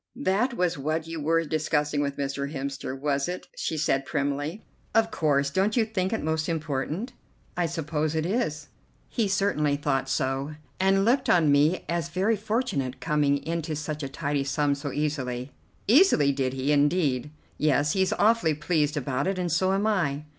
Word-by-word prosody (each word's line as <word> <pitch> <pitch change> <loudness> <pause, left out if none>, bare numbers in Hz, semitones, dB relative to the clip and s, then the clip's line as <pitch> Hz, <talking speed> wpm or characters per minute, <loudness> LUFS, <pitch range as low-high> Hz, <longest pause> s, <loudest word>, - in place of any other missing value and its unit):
"That 240 0 0
was 180 -5 0
what 155 +3 -1
you 165 0 -5
were 165 +2 +2
discussing 150 -1 0
with 140 -1 -2
Mr. 140 0 -3
Hemster, 135 -2 -4
was 140 -1 0
it?" 180 - -5
she 160 - -2
said 135 -2 +1
primly. 145 +6 -2 0.3
"Of 225 0 +3
course. 140 -3 +1
Don't 195 - +1
you 225 - +4
think 190 -4 -2
it 225 - -2
most 160 +1 -1
important?" 160 - -3 0.4
"I 175 -2 +1
suppose 155 -1 -2
it 160 0 0
is." 155 - -2 0.4
"He 225 -4 0
certainly 190 -7 +1
thought 135 -2 -1
so, 135 +3 -1 0.2
and 195 +1 +3
looked 255 +3 +2
on 160 -4 +4
me 150 +5 +3
as 170 0 -2
very 195 +6 +1
fortunate 210 - -2
coming 145 -2 +1
into 165 -1 -2
such 150 +1 -4
a 135 - -4
tidy 145 0 -1
sum 145 +1 +1
so 140 0 -4
easily." 135 -4 -2 0.4
"Easily! 225 - +5
Did 130 -2 -1
he, 135 +2 -1
indeed?" 145 -2 +2 0.3
"Yes, 150 0 +2
he's 190 -1 +1
awfully 210 -8 +3
pleased 150 0 0
about 135 +1 -1
it, 195 -1 -1
and 180 -2 -1
so 185 +4 +2
am 195 +2 +1
I." 165 -10 0
155 Hz, 175 wpm, -26 LUFS, 140-185 Hz, 0.4 s, Easily